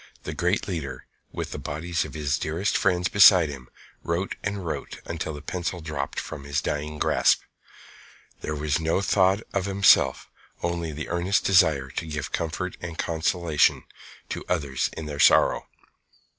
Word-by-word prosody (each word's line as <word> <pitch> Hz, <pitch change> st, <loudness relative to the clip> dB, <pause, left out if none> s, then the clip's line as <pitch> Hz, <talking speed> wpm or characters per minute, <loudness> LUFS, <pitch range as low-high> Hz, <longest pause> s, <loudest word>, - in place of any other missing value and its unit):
The -, -, -5 dB
great 90 Hz, +4 st, 0 dB
leader, 80 Hz, -8 st, -5 dB, 0.3 s
with -, -, -5 dB
the -, -, -5 dB
bodies 85 Hz, +4 st, -2 dB
of -, -, -10 dB
his 70 Hz, -2 st, -1 dB
dearest 85 Hz, +6 st, -1 dB
friends 90 Hz, -2 st, +2 dB
beside 90 Hz, -5 st, +7 dB
him, 65 Hz, -3 st, -9 dB, 0.3 s
wrote 85 Hz, +3 st, -2 dB
and 100 Hz, -2 st, -3 dB
wrote 80 Hz, -, -5 dB
until 85 Hz, -1 st, -4 dB
the 75 Hz, -, -9 dB
pencil 90 Hz, +2 st, -3 dB
dropped 75 Hz, -2 st, -4 dB
from 70 Hz, -, -7 dB
his 70 Hz, 0 st, -1 dB
dying 75 Hz, +1 st, -3 dB
grasp. -, -, +3 dB, 1.0 s
There 75 Hz, -, -4 dB
was 75 Hz, 0 st, 0 dB
no 80 Hz, +4 st, +1 dB
thought 95 Hz, 0 st, +3 dB
of 100 Hz, -2 st, 0 dB
himself, 100 Hz, 0 st, +4 dB, 0.4 s
only 85 Hz, -1 st, -2 dB
the 75 Hz, +1 st, -6 dB
earnest 85 Hz, +4 st, +1 dB
desire 75 Hz, -8 st, +4 dB
to 80 Hz, -, -4 dB
give 75 Hz, -1 st, -4 dB
comfort 85 Hz, +3 st, -3 dB
and 85 Hz, -2 st, -6 dB
consolation 80 Hz, -1 st, +1 dB, 0.5 s
to -, -, -4 dB
others 70 Hz, -7 st, 0 dB
in 80 Hz, -, -5 dB
their 75 Hz, -1 st, -6 dB
sorrow. -, -, +4 dB
80 Hz, 155 wpm, -25 LUFS, 75-90 Hz, 1.0 s, beside